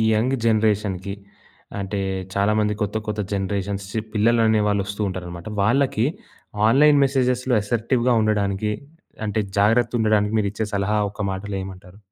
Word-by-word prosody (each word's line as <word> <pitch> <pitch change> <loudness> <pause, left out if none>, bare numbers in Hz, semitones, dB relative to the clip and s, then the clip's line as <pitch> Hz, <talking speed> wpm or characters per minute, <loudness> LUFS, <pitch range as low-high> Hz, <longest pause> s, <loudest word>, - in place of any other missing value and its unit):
Young 125 +5 +1
జనరేషన్‌కి 105 -4 +1 0.7
అంటే, 100 +1 -3 0.3
చాలామంది 105 +1 +2
కొత్త, 105 0 -2
కొత్త 105 0 -2
జనరేషన్స్ 100 0 -2 0.3
పిల్లలనేవాళ్ళు 110 -2 +3
వస్తూ 100 +1 -5
ఉంటారనమాట. 90 -1 -6
వాళ్ళకి 120 +1 +2 0.6
ఆన్‌లైన్ 145 +4 +5
మెసేజెస్‌లో 125 -1 0
అసర్టివ్‌గా 120 +3 +1
ఉండడానికి, 105 -1 0 0.6
అంటే, 105 +1 -1 0.2
జాగ్రత్త 115 +3 +3
ఉండడానికి 105 -1 +2
మీరు 100 -2 0
ఇచ్చే 110 +1 -3
సలహా 100 +2 0
ఒక్క 100 - -8
మాటలో 100 +1 -5
ఏమంటారు? 95 0 -11
105 Hz, 120 wpm, -22 LUFS, 100-115 Hz, 0.7 s, ఆన్‌లైన్